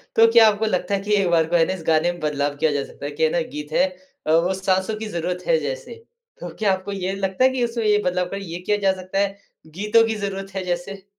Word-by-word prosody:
तो 225 0 +7
क्या 230 -1 +8
आपको 210 +1 -1
लगता 185 -1 -1
है 195 - +2
कि 205 - -5
एक 195 -3 +2
बार 165 -2 +3
को 175 - +1
है 165 -1 +5
ना 185 - -1
इस 175 -4 -8
गाने 160 +2 +3
में 175 - -10
बदलाव 145 -1 -1
किया 155 0 +2
जा 140 -1 -1
सकता 145 - -10
है 145 - -3
कि 155 +2 -2
है 160 - +4
ना 175 - +1 0.2
गीत 150 0 -6
है 275 - +3 0.4
अ, - - +2
वो 175 +3 +3
साँसों 190 +2 0
की 220 - -4
ज़रूरत 180 -1 -3
है - - +4
जैसे। - - -5 0.4
तो - - -6
क्या 200 -3 +3
आपको 190 +2 -5
ये 190 -1 -3
लगता 195 +4 -1
है 260 - +6
कि 260 -2 -1
उसमें 230 -1 -2
ये 210 0 +4
बदलाव 180 0 +1
कर 195 - -4
ये 175 -2 -6
किया 210 +3 0
जा 195 -2 +2
सकता 185 +2 -3
है, 200 0 0 0.3
गीतों 210 +8 +2
की 225 - -1
ज़रूरत 195 -1 -5
है 190 - -2
जैसे? 185 +2 -4
190 Hz, 280 wpm, -22 LUFS, 175-210 Hz, 0.4 s, क्या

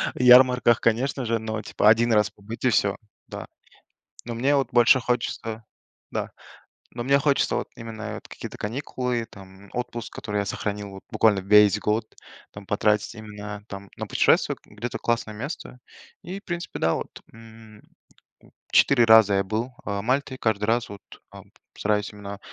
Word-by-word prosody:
Ярмарках, 125 -1 +6
конечно 125 +3 0
же, 115 0 +1
но 110 -1 -4
типа 105 - 0
1 115 +1 +4
раз 105 -1 +3
побыть 110 +5 -8
и - - +5
всё, 100 -1 +2 0.3
да. - - -8 0.8
Но 120 0 -5
мне 135 +4 +2
вот 135 -3 +1
больше 120 +2 +6
хочется 115 -2 -3 0.5
Да, - - -3 0.6
но 120 0 -5
мне 140 +2 +4
хочется 140 0 +1
вот - - -2
именно 115 -1 -8
это 110 - -7
какие-то - - -8
каникулы, 125 0 -3
там 95 0 -14
отпуск, 120 -2 -5
который 105 0 -3
я 100 - -1
сохранил 100 +1 -4
вот 95 - -11
буквально 105 -3 +3
весь 105 +1 +5
год, 110 +2 0 0.5
там 100 -1 -11
потратить 105 +1 0
именно, 105 -1 -8
там, 100 0 -8
на - - -5
путешествие, - - +2
где-то 115 +3 -6
классное 115 -2 -1
место 125 0 -7 0.4
и, 185 +4 -6
в - - -28
принципе, 175 -1 -5
да, 80 0 +2
вот, - - -4 0.3
м, 110 -1 -15 0.9
4 125 -4 +5
раза 110 -2 +7
я 100 - +2
был, 115 +6 -3
а, 100 -1 -2
Мальте, 130 +3 -1
каждый 110 -3 0
раз 115 +2 +1
вот, 100 -3 -10 0.3
ам, - - -12 0.3
стараюсь 105 0 0
именно 100 -1 -8
110 Hz, 160 wpm, -24 LUFS, 105-120 Hz, 0.9 s, раза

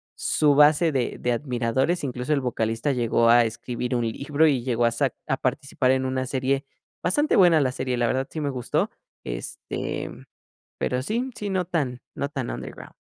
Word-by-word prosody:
su 145 -2 +2
base 150 +3 +5
de 130 -4 -1
de 125 - 0
admiradores. 130 +6 0
Incluso 125 +3 -2
el 140 - +1
vocalista 115 +1 -1
llegó 115 -1 +2
a 120 0 +7
escribir 120 +2 -3
un 120 -1 0
libro 145 +5 +2
y 130 -5 +1
llegó 120 -2 +1
a 115 - +3
sa - - 0 0.2
a - - 0
participar 130 -1 0
en 130 0 +1
una 130 0 -1
serie 135 +2 -1 0.4
bastante 290 - +2
buena 170 -5 +6
la 130 -2 +1
serie, 130 -2 -2
la 120 - +2
verdad 130 +3 0
sí 160 - -5
me 145 - -1
gustó. 125 -3 -1 0.3
Este, - - -4 0.7
pero 125 0 0
sí, 235 - -1
sí, 205 -1 -4
no 185 -2 0
tan 140 -8 -2
no 140 - -2
tan 145 - -4
underground. - - -8
130 Hz, 185 wpm, -25 LUFS, 120-150 Hz, 0.7 s, a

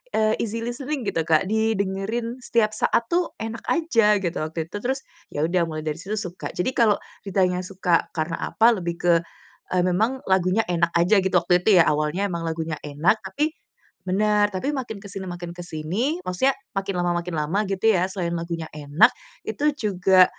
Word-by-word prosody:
eee, 215 0 +3
easy 230 +1 -3
listening 260 +2 -3
gitu, 165 - 0
Kak. 160 +3 +4
Didengerin 220 +2 -1
setiap 215 -2 +2
saat 235 - +1
tuh 350 0 +1
enak 225 +1 -5
aja, 230 -11 +3
gitu 175 -3 -2
waktu 160 +1 -3
itu. 205 - -5
Terus, 265 +2 0 0.3
ya 150 +2 +1
udah 175 0 +2
mulai 155 -1 -4
dari 155 -1 -1
situ 210 +3 -4
suka. 180 -3 -6
Jadi 180 +8 -1
kalau 220 -4 +4 0.3
ditanya 185 -2 +1
suka 180 -3 0
karena 160 +1 -1 0.2
apa, 230 +1 +5
lebih 170 -2 -3
ke, 175 -1 +4 0.6
eee, 180 - +3
memang 220 +9 +1
lagunya 190 +3 +3
enak 170 -1 +2
aja 195 +4 +4
gitu 190 - 0
waktu 180 -1 +3
itu 200 -5 +6
ya, - - +4
awalnya 155 +6 0
emang 170 -1 -3
lagunya 160 -1 -2
enak, 150 +9 +2
tapi 295 +12 -1 0.5
bener, 205 +2 +3
tapi 190 +10 -1
makin 245 -6 -4
ke 200 - -8
sini 190 0 -6
makin 175 -1 -6
ke 175 - -8
sini, 185 - -2
maksudnya 220 +10 +2 0.2
makin 195 0 -1
lama 175 0 +1
makin 175 -1 -5
lama 155 +7 0
gitu 195 +1 -2
ya, 185 0 +2
selain 175 -3 -3
lagunya 165 -1 -4
enak 150 - +4 0.4
itu 300 +1 +1
juga, 190 -5 +5
190 Hz, 185 wpm, -24 LUFS, 170-220 Hz, 0.6 s, itu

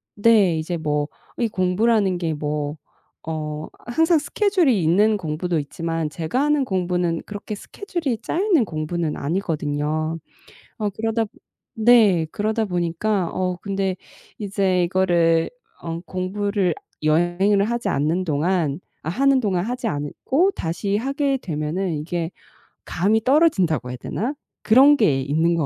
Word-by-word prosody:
네. 205 -6 +4
이제 165 +2 -3
뭐 150 -2 -1 0.3
이 235 - +1
공부라는 195 +1 +2
게 165 -2 -1
뭐 150 0 -3 0.5
어 155 -1 -4 0.2
항상 320 +6 +3
스케줄이 335 - +2
있는 205 +7 +3
공부도 170 0 -2
있지만 165 +2 -3
제가 160 - -1
하는 295 -1 +2
공부는 180 -5 -1
그렇게 205 +1 -6
스케줄이 335 - -4
짜여 320 - -3
있는 350 - +4
공부는 155 -1 -3
아니거든요. 155 -1 -2 0.6
어 210 -2 0
그러다 225 +2 -1 0.5
네. 215 -7 +5
그러다 220 +2 0
보니까 180 +2 -1
어 185 -1 -1
근데 195 -2 -1 0.4
이제 195 -3 +1
이거를 170 -2 +2 0.3
어 165 0 -5
공부를 190 0 -1 0.3
여행을 175 +6 +3
하지 235 +2 -2
않는 155 +6 0
동안 160 -1 0 0.2
아 - - -5
하는 275 +7 +3
동안 190 -6 0
하지 245 +2 -3
않고 225 - 0
다시 175 +5 -1
하게 275 +4 0
되면은 165 +1 -2
이게 165 +1 -3 0.6
감이 210 +6 +1
떨어진다고 190 - +3
해야 125 - -5
되나? 235 - -3 0.3
그런 270 +6 +7
게 160 - +3
있는 160 +5 +1
것 160 -3 0
185 Hz, 280 characters per minute, -22 LUFS, 160-220 Hz, 0.6 s, 그런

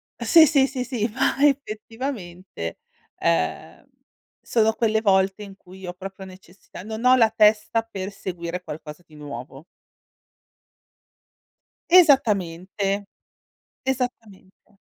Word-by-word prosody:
sì, 325 -2 +6
sì, 275 -3 +3
sì, 260 -2 -4
sì, 235 -3 -2
ma 260 +3 0
effettivamente, 215 - -4 0.4
ehm, 80 -1 -1 0.6
sono 220 -1 +1
quelle 220 -1 +1
volte 195 0 +2
in 195 -1 -11
cui 190 0 -13
ho 175 - -5
proprio 190 +1 -9
necessità 185 -1 -13
non 220 +3 -6
ho 255 - +7
la 225 -3 +4
testa 215 +1 +3
per 195 -3 -6
seguire 180 -2 -6
qualcosa 150 +2 -9
di 155 - -19
nuovo. 140 -1 -9 2.3
Esattamente. 200 - +3 0.8
Esattamente. 220 -6 -5
200 Hz, 105 wpm, -23 LUFS, 180-230 Hz, 2.3 s, ho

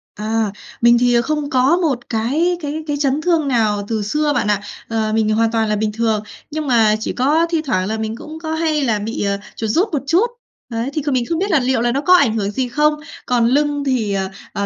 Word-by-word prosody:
À, 220 0 -1 0.3
mình 235 0 +6
thì 245 -1 +3
không 300 +1 -2
có 265 +6 +3
một 280 -9 -1
cái 290 +11 0
cái 305 +1 -4
cái 290 - -1
chấn 285 +1 0
thương 330 -3 +1
nào 215 -5 +1
từ 220 -2 -1
xưa 300 +7 0
bạn 250 - 0
ạ. 205 -1 +1 0.3
Ờ, 220 -1 -1
mình 220 -1 +2
hoàn 225 +1 +2
toàn 225 -1 0
là 210 - +1
bình 210 0 -1
thường. 220 -2 0 0.3
Nhưng 310 0 -3
mà 225 -4 +4
chỉ - - -3
có 300 +6 +2
thi 330 -2 0
thoảng 185 -8 0
là 220 - -2
mình 220 0 -3
cũng 315 +4 -9
có 320 -1 -4
hay 315 -2 0
là 220 -5 +1
bị, 220 +2 -3
à, 200 0 0 0.2
chuột 220 - -3
rút 350 - +2
một 280 - -1
chút. 350 +9 +4 0.5
Đấy, 230 +3 -2
thì 305 - -1
kh 295 - -12
mình 255 -2 +1
không 330 - 0
biết 395 +2 -1
là 310 - +4
liệu 250 -2 +1
là 240 - +1
nó 275 +3 -1
có 360 +5 +4
ảnh 235 -10 +3
hưởng 200 -1 -1
gì 255 +4 -1
không? 300 +4 +2 0.3
Còn 245 -2 +2
lưng 290 +3 +1
thì, 240 -7 0
ờ, 190 -1 -1 0.2
ờ, 200 - -2
245 Hz, 250 wpm, -19 LUFS, 220-300 Hz, 0.5 s, mình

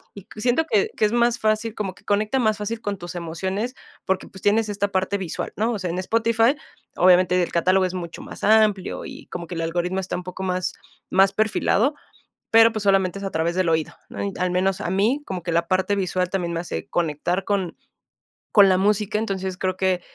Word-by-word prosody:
y 200 -2 -11
siento 250 +7 +2
que 210 -10 +2
que - - +3
es 210 - +1
más 240 0 +2
fácil, 215 +1 0
como 195 -3 -3
que - - -21
conecta 210 +5 +1
más 215 -3 +2
fácil 220 +2 -4
con 205 -3 -3
tus 175 0 -8
emociones, 190 +8 -3 0.3
porque, 190 0 -1
pues, 190 - -13
tienes 215 +1 +2
esta 200 0 0
parte 190 +1 0
visual, 180 -4 -4
¿no? 225 +3 0
O - - -2
sea, 180 -3 -2
en 180 - -3
Spotify, 230 +5 +2 0.4
obviamente, 180 0 +5
el - - -4
catálogo 185 +2 +3
es 185 - -3
mucho 170 -2 -6
más - - -10
amplio, 215 -3 +3
y - - -10
como 175 - -6
que - - -7
el 165 - -2
algoritmo 175 +3 -1
está 185 - -3
un 180 - -6
poco 180 +1 -7
más 185 -1 -1 0.4
más 195 +1 +5
perfilado, 220 +4 +2 0.6
pero 225 0 +8
pues 215 - -3
solamente 195 -1 +2
es 200 - -6
a 195 - -2
través 165 +2 0
del 185 -2 +1
oído, 160 -1 0 0.2
¿no? - - -5
Y 200 - -1
al 185 0 0
menos 185 +1 +1
a - - -2
mí, 220 +10 +1
como 185 -2 -4
que 170 - -3
la 170 0 +1
parte 190 +2 +1
visual 185 -2 0
también 180 -3 -2
me 165 - -1
hace 175 - -5
conectar 175 +3 -1
con 195 -4 -1 0.8
con 200 -2 +7
la 185 - +4
música, 210 +1 +1
entonces 190 -4 -3
creo 185 -1 -1
que 185 -2 +1
190 Hz, 220 wpm, -23 LUFS, 180-215 Hz, 0.8 s, pero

